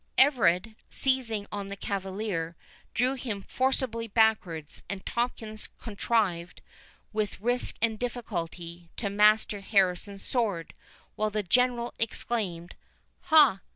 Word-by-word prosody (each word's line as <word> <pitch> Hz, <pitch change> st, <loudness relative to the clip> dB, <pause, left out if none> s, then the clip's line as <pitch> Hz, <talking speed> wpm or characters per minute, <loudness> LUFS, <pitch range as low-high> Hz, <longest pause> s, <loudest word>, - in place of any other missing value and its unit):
Everard, 225 Hz, -, +4 dB, 0.2 s
seizing 245 Hz, -6 st, +1 dB
on 200 Hz, -1 st, -4 dB
the 200 Hz, -, -5 dB
cavalier, 190 Hz, -4 st, -3 dB, 0.4 s
drew 255 Hz, +2 st, +2 dB
him 230 Hz, -7 st, -4 dB
forcibly 255 Hz, -3 st, -1 dB
backwards, 205 Hz, -9 st, +1 dB
and 195 Hz, 0 st, -5 dB
Tomkins 225 Hz, -3 st, -2 dB
contrived, 200 Hz, -5 st, -1 dB, 0.5 s
with 215 Hz, -3 st, -1 dB
risk 245 Hz, +4 st, +1 dB
and 220 Hz, -2 st, +1 dB
difficulty, 175 Hz, -8 st, -5 dB
to 200 Hz, -4 st, -2 dB
master 210 Hz, 0 st, +4 dB
Harrison's 195 Hz, 0 st, +1 dB
sword, 210 Hz, -10 st, -1 dB, 0.4 s
while 215 Hz, 0 st, 0 dB
the 210 Hz, 0 st, -1 dB
General 240 Hz, +4 st, +2 dB
exclaimed, 205 Hz, -6 st, -2 dB, 0.5 s
"Ha! 290 Hz, -, +6 dB
215 Hz, 110 wpm, -28 LUFS, 190-235 Hz, 0.5 s, Ha